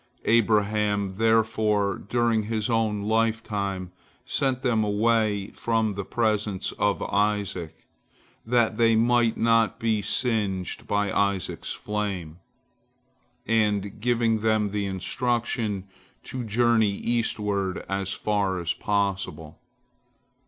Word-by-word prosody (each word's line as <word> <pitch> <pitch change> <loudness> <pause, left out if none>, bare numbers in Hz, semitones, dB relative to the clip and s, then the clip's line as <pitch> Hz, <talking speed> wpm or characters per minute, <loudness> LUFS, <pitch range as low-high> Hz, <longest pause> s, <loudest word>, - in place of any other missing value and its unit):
Abraham, 105 -3 +2
therefore, 110 -2 +2
during 115 0 0
his 110 0 -1
own 110 -3 0
lifetime, 105 -4 -1 0.3
sent 130 -2 0
them 115 -4 +2
away 105 -1 +1
from 110 -2 0
the 100 +1 -4
presence 105 -3 -1
of 105 -1 +1
Isaac, 100 -5 -1 0.6
that 115 -2 +1
they 115 -1 +4
might 120 0 +3
not 115 -1 +3
be 110 -2 +1
singed 105 -4 -1
by 100 -1 0
Isaac's 100 -2 -1
flame, 95 -6 -4 1.1
and 105 -2 0
gave 115 -2 +1
them 110 -2 +1
the 100 -1 -1
instruction 110 +1 -1 0.4
to 130 -1 -5
journey 115 0 +3
eastward 105 -5 -1
as 95 -1 -2
far 100 -2 0
as 85 0 -1
possible. 100 -6 -2
105 Hz, 105 wpm, -25 LUFS, 100-115 Hz, 1.1 s, they